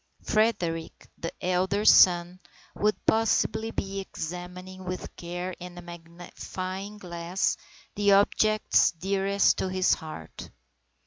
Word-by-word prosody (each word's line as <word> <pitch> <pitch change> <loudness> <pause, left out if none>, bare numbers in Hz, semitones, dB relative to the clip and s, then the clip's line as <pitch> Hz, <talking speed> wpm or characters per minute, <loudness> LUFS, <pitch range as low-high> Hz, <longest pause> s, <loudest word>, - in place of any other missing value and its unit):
Frederick, 175 -7 -1
the 165 - -4
elder 190 +3 +1
son, 175 -2 +6 0.3
would 210 +1 +1
possibly 220 0 +2
be 195 -3 -4
examining 180 +1 -7
with 185 0 -6
care 175 +2 -5
and 180 0 -9
a - - -7
magnifying 180 +3 -7
glass 175 -1 -2 0.4
the 205 0 +2
objects 215 +2 +3
dearest 195 +3 +1
to 190 - -1
his 185 0 +2
heart. 155 - -8
185 Hz, 110 wpm, -27 LUFS, 175-200 Hz, 0.4 s, son